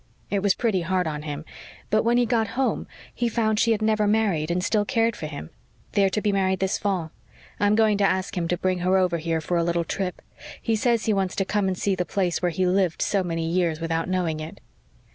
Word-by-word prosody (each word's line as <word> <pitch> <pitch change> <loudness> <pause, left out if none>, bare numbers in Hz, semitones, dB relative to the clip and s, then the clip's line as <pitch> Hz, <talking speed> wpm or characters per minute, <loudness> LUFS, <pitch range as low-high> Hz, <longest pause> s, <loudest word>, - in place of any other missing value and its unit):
It 200 -1 +1
was 200 -1 +3
pretty 215 -6 +1
hard 180 +1 0
on 150 -2 -3
him, 150 0 -6 0.5
but 215 +1 +4
when 235 +1 +2
he 245 - +3
got 225 -1 +1
home 270 - 0 0.3
he 240 - 0
found 220 -2 +1
she 230 0 +3
had 215 -1 +1
never 215 -1 +2
married 205 -8 +1
and 180 +1 0
still 210 +1 +2
cared 230 -1 +1
for 155 - -5
him. 145 - -8 0.4
They 200 - +3
are 195 - +4
to 210 +3 -1
be 210 - +2
married 190 -1 +1
this 190 0 0
fall. 185 -6 -1 0.5
I'm 205 +1 +3
going 215 -2 +3
to - - +3
ask 190 +1 0
him 170 -2 -1
to 175 - 0
bring 185 0 0
her 185 +2 +2
over 180 -3 +1
here 165 0 -1
for 175 +2 -1
a 170 - +2
little 170 0 0
trip; 180 +2 -4 0.4
he 225 - 0
says 235 0 +1
he 220 - +2
wants 190 -2 -1
to 195 - 0
come 205 0 0
and 185 -1 -1
see 200 - 0
the 180 -1 0
place 180 -1 -1
where 180 - +2
he 185 +3 0
lived 180 -2 +1
so 195 -2 +1
many 165 -2 -2
years 170 -2 0
without 165 +1 -2
knowing 175 -4 0
it." 155 +1 -8
190 Hz, 245 wpm, -24 LUFS, 170-210 Hz, 0.5 s, but